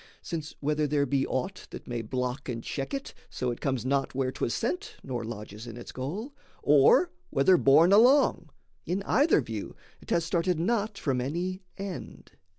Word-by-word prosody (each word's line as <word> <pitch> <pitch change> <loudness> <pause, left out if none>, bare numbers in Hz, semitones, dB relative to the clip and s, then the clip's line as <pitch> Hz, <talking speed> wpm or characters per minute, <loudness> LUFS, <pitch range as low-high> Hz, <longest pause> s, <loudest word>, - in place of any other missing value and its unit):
Since 160 -3 -5
whether 150 +1 +1
there 145 0 +2
be 135 0 0
Aught 180 +9 -3
that - - -9
may 120 -1 -3
block 125 +4 -3
and 115 -2 -4
check 135 -2 -4
it 275 0 -4 0.2
so 125 -1 -2
it 120 - -7
comes 130 -4 -1
Not 135 0 0
where 130 -1 0
'twas 120 - -2
sent, 400 - -2
nor 125 -3 -4
lodges 110 0 -7
in 115 0 -8
its 120 - -8
goal, 190 - -5 0.3
Or 150 - +5 0.2
whether 140 +8 +4
borne 165 +3 +6
along, 235 - +5 0.4
in 185 +4 -1
either 280 - +4
view 110 -4 -6 0.3
'Thas 170 -1 0
started 170 0 0
not 210 +2 0
from 135 -8 0
any 175 +8 -3 0.2
end. 195 -3 -7
150 Hz, 170 wpm, -28 LUFS, 130-185 Hz, 0.4 s, borne